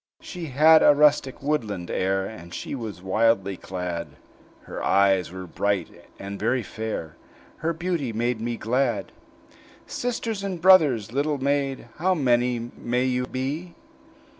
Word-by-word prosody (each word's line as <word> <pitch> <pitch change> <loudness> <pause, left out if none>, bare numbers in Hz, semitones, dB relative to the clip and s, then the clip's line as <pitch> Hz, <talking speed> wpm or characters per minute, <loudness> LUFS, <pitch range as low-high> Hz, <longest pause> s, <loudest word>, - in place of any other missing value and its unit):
She 180 -3 -7
had 155 +4 +6
a 145 - +6
rustic, 145 -3 +3
woodland 110 -12 -2
air, 95 +1 0
And 85 -5 -9
she - - -5
was 110 -8 -6
wildly 100 0 +2
clad; 90 -2 -5 0.6
Her - - -7
eyes 95 -3 +3
were 95 0 -7
bright, 95 -1 -2
and 100 0 -7
very 120 +3 +1
fair 110 -7 -5 0.4
Her 165 - -1
beauty 165 -6 -2
made 115 +1 -1
me 120 0 -2
glad. 120 -5 0 0.7
"Sisters 230 -4 -3
and 190 -3 -3
brothers, 150 - +5
little 145 +2 0
maid, 135 -2 -1
How 185 +3 +2
many 125 -4 +2 0.2
may 125 +2 -1
you 125 -1 0
be?" 145 +8 -4
125 Hz, 140 wpm, -25 LUFS, 100-150 Hz, 0.7 s, had